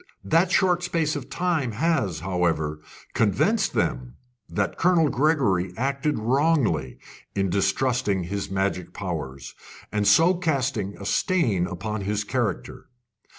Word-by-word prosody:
That 165 +3 +2
short 180 -2 +3
space 165 -3 -1
of 140 -3 -6
time 165 -9 -1
has, 110 - 0
however, 85 -4 -1 0.3
convinced - - +2
them - - -1 0.3
that 100 -1 -1
Colonel 170 -3 +3
Gregory 120 - +1
acted 140 +3 -1
wrongly 120 - +1 0.4
in 95 -2 0
distrusting 100 +1 +1
his 100 +3 -4
magic 95 -1 -2
powers, 75 -9 -5 0.4
and 105 0 0
so 170 +3 +6
casting 135 - -1
a 100 - -9
stain 115 - +1
upon 100 +3 -4
his 105 +2 -1
character. 105 -4 -3
105 Hz, 120 wpm, -24 LUFS, 95-155 Hz, 0.4 s, so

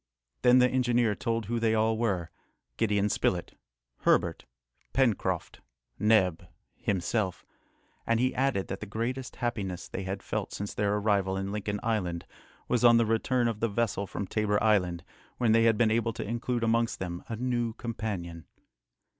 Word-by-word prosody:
Then 125 0 +6
the 125 0 +6
engineer 120 -3 +2
told 115 +1 -2
who 115 +3 -1
they 110 -1 +2
all 110 +1 +2
were, 95 -8 -1 0.5
Gideon 105 -2 +2
Spilett, 90 -3 -1 0.4
Herbert, - - +2 0.5
Pencroft, 125 -6 0 0.4
Neb, 95 -6 +3 0.3
himself; 95 0 -1 0.6
and 115 0 +2
he 130 +1 +2
added, 130 -7 0
that 95 - -5
the 105 - -7
greatest 120 +5 -3
happiness 100 -7 -3
they - - -5
had 95 +1 -4
felt - - -3
since 100 0 -4
their 105 0 +1
arrival 100 -2 +1
in 95 +1 -3
Lincoln 105 0 -3
Island 90 -7 -1 0.4
was 125 -1 +1
on 120 -1 +7
the 115 - +4
return 120 +2 +1
of 115 -3 -2
the 115 - +1
vessel 105 -2 -1
from 100 - -4
Tabor 105 +1 0
Island, 90 -6 +2 0.3
when 120 -3 +2
they 115 +1 +5
had 115 -2 +4
been 110 -1 +3
able 115 0 +1
to - - -5
include 120 +1 -2
amongst 115 0 +1
them 90 -1 -5
a 115 - -2
new 120 -1 -1
companion. 105 -8 -5
110 Hz, 165 wpm, -29 LUFS, 100-115 Hz, 0.6 s, on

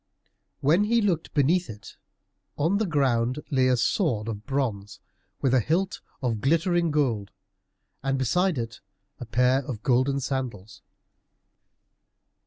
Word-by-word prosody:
When 165 +9 +3
he 235 +2 +3
looked 185 -7 0
beneath 165 +6 +2
it, 105 0 -10 0.6
on 170 +7 +1
the 220 - 0
ground 130 -5 +1
lay 130 -2 +3
a 125 -1 +3
sword 120 - 0
of 105 -1 -6
bronze, 115 -7 -2 0.4
with 130 -2 +2
a 130 - +5
hilt 180 - -1 0.2
of 115 -4 -1
glittering 170 - +2
gold, 125 -10 0 0.7
and 135 0 0
beside 180 +7 +1
it 115 -2 -5 0.4
a 125 - -7
pair 125 +3 +2
of 120 -5 -6
golden 130 +2 +2
sandals. 125 -7 -4
135 Hz, 130 wpm, -26 LUFS, 115-160 Hz, 0.7 s, a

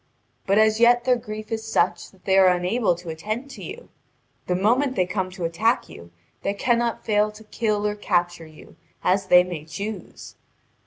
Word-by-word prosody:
But 195 +1 +3
as 215 0 +4
yet 240 +1 +5
their 250 0 +3
grief 215 -2 -7
is 220 0 -2
such 200 -5 0
that 190 -2 -25
they 190 - +2
are 190 - +6
unable 180 +3 +1
to 175 0 -10
attend 215 - -5
to - - -10
you. 465 +5 -9 0.6
The 180 - +1
moment 250 +8 +2
they 185 - +2
come 185 +1 -2
to 180 -2 -5
attack 215 +9 0
you, 85 - -12 0.3
they 200 - -2
cannot 235 +2 0
fail 210 -1 +2
to 210 +1 -14
kill 210 -1 -1
or 210 - +1
capture 175 -5 -1
you, 155 -1 -16 0.3
as 190 +1 +1
they 180 -1 +7
may 175 -4 -6
choose." 200 +4 -7
205 Hz, 190 wpm, -23 LUFS, 180-225 Hz, 0.6 s, they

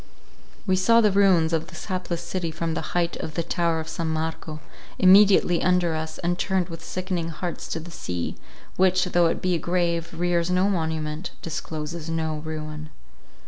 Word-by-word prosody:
We 190 -2 +2
saw 230 +5 +5
the 215 -3 +4
ruins 185 -5 +4
of 165 0 0
this 180 -2 -9
hapless 180 -3 -3
city 170 0 -3
from 160 +1 -3
the - - -2 0.2
height 170 -1 0
of 155 - -6
the 170 - 0
tower 170 -1 0
of 160 - -5
San 165 0 -3
Marco, 160 -1 -3 0.4
immediately 190 -2 +6
under 180 -2 +2
us, 160 0 -4
and 175 +1 -1
turned 190 -2 0
with 165 -1 -8
sickening 180 -1 -3
hearts 170 +2 -5
to 165 - -3
the 170 +2 -10
sea, 90 - -4 0.4
which, 185 -1 +4
though 175 -1 +3
it 165 - -2
be 185 0 +2
a 170 - +1
grave, 170 0 0
rears 175 -1 +1
no 185 +2 +3
monument, 160 -1 -2
discloses 160 0 -5
no 160 -1 -1
ruin. 155 0 -6
170 Hz, 180 wpm, -25 LUFS, 160-180 Hz, 0.4 s, immediately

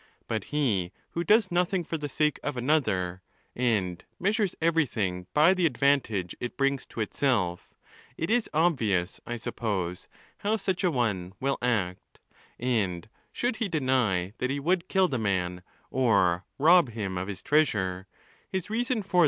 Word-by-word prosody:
But 110 -3 -2
he 110 -12 0 0.2
who 170 - -2
does 210 0 +4
nothing 180 +1 +1
for 165 - -4
the 150 -2 -4
sake 150 +2 +1
of 145 -3 -3
another, 105 - +1 0.3
and 100 -8 0 0.2
measures 200 0 +1
everything 115 - 0
by 155 +5 +5
the 180 -3 +3
advantage 135 - +1
it 120 - -5
brings 140 -1 0
to 115 - -5
itself, 105 -7 -1 0.4
it 165 +6 -2
is 240 -1 +2
obvious, 115 - +1
I 120 - -2
suppose, 105 -7 -3 0.3
how 215 +2 +1
such 190 -2 -2
a 180 - +4
one 105 - -1
will 135 +1 0
act; 105 -7 -1 0.4
and 110 -7 0 0.2
should 240 -2 -1
he 225 -4 -1
deny 125 - +1
that 125 - 0
he 140 +1 -1
would 175 +4 +1
kill 190 -1 +4
the 130 -7 -2
man, 90 -4 -1 0.3
or 100 -8 +2
rob 165 0 +6
him 100 -4 -3
of 90 +1 -3
his 100 -2 -6
treasure, 95 -11 +1 0.4
his 190 +2 -3
reason 240 0 0
for. 185 -2 +1
130 Hz, 155 wpm, -28 LUFS, -, 0.4 s, rob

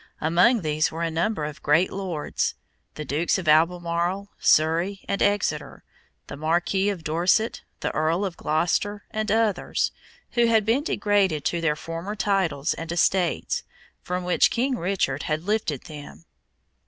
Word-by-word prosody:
Among 180 +9 +3
these 155 -1 0
were 165 +1 -4
a 165 - -1
number 165 0 -1
of 150 -1 -7
great 155 +5 +3
lords 185 -6 -2 0.4
the 150 - -6
Dukes 155 +8 0
of 185 -4 -5
Albemarle, 170 +4 +2
Surrey, 170 +6 +2
and 200 - -2
Exeter, 205 0 0 0.4
the - - -8
Marquis 175 +6 +1
of 190 -5 -4
Dorset, 175 +8 +1 0.2
the - - -2
Earl 165 +5 +1
of 185 -3 -4
Gloucester, 200 +6 0
and 215 0 -2
others 220 -4 +1 0.4
who 240 -1 +3
had 220 -2 +3
been 235 +6 +2
degraded 200 - +1
to 170 - 0
their 155 -2 +1
former 165 +7 -6
titles 190 -8 0
and 165 0 -6
estates, 175 +1 +1 0.4
from 180 0 -3
which 180 0 +3
King 255 +2 0
Richard 175 - -1
had 155 +1 -1
lifted 200 - -1
them. 155 0 -11
175 Hz, 150 wpm, -24 LUFS, 160-200 Hz, 0.4 s, Among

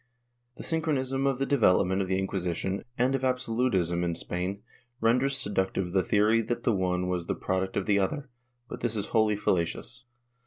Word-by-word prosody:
^ - - -47
The - - -9
synchronism 140 -5 0
of 135 -2 +1
the 135 - 0
development 95 -8 +3
of 95 - -2
the 95 0 0
Incjuisition 95 0 -2
and 125 +2 +2
of 135 -1 -1
absolutism 115 -9 +1
in 85 -1 -1
Spain 90 +5 -3 0.4
renders 125 +4 +2
seductive 95 -6 -1
the 95 +1 +3
theory 105 +5 +3
that 120 +1 -3
the 115 - +3
one 90 -1 0
was 90 -2 -2
the - - -1
product 95 0 -2
of 100 - 0
the 100 -1 +3
other, 135 +9 -1 0.4
but - - -7
this 115 -2 -1
is 105 - -3
wholly 110 -2 +4
fallacious. 100 +7 -1
105 Hz, 185 wpm, -28 LUFS, 95-125 Hz, 0.4 s, wholly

